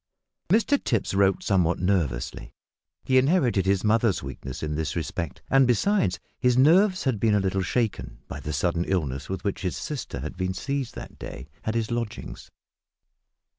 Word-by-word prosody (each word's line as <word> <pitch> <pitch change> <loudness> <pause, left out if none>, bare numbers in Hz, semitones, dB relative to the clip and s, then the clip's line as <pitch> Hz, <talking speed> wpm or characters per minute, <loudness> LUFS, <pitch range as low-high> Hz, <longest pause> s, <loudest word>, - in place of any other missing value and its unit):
Mr 230 - +3
Tipps 115 -6 0
wrote 95 0 +3
somewhat 90 -4 +2
nervously. 70 -10 -1 0.5
He 130 0 +4
inherited 130 - +2
his 95 -1 +2
mother's 110 -4 +2
weakness 65 0 -7
in 75 0 -2
this 75 -1 -2
respect; 85 -1 -4
and, 135 -1 +4
besides, 125 - +2 0.2
his 125 -1 +3
nerves 185 +8 +5
had 130 -7 0
been 110 0 +3
a - - +4
little 95 0 0
shaken, 105 - -1
by - - -6
the 75 - -5
sudden 85 +4 0
illness, 70 -8 -2
with 95 -1 -4
which 100 -2 -2
his 90 -2 -2
sister 145 - -5
had 75 - -5
been 95 0 -2
seized 140 0 -3
that - - -9
day, 60 - -8 0.2
at 110 - -1
his 115 0 -1
lodgings. 120 -2 -5
100 Hz, 170 wpm, -26 LUFS, 85-125 Hz, 0.5 s, nerves